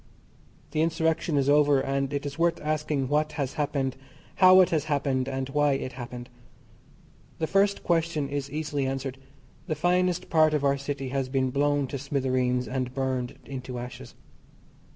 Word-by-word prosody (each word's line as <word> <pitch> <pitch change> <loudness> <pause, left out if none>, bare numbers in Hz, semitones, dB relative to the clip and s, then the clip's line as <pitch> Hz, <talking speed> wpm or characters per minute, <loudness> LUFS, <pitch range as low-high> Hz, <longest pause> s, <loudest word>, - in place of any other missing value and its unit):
The 155 - 0
Insurrection 160 -1 +1
is 140 -1 +2
over, 145 -1 +5
and 135 0 -1
it 145 0 -3
is 145 +2 -6
worth 170 0 +2
asking 150 -3 -1
what 150 +2 +1
has 140 -3 -2
happened, 140 -3 -1 0.4
how 185 -1 +8
it 180 - +2
has 155 -3 +1
happened, 135 -3 0
and 135 -1 -3
why 145 0 +2
it 130 -1 -3
happened? 120 -1 -8 1.1
The 160 - -1
first 200 +3 +2
question 165 -4 0
is 140 0 -3
easily 145 -2 -2
answered. 135 0 -4 0.5
The 155 - -1
finest 180 +2 +1
part 155 -1 +4
of 145 - -1
our 140 0 +2
city 140 -1 -4
has 135 -1 -2
been 130 -1 0
blown 145 +1 +1
to 135 +1 -5
smithereens, 130 -2 0
and 130 0 -3
burned 130 -2 -2
into 130 -2 -6
ashes. 120 +1 -8
140 Hz, 165 wpm, -27 LUFS, 130-155 Hz, 1.1 s, how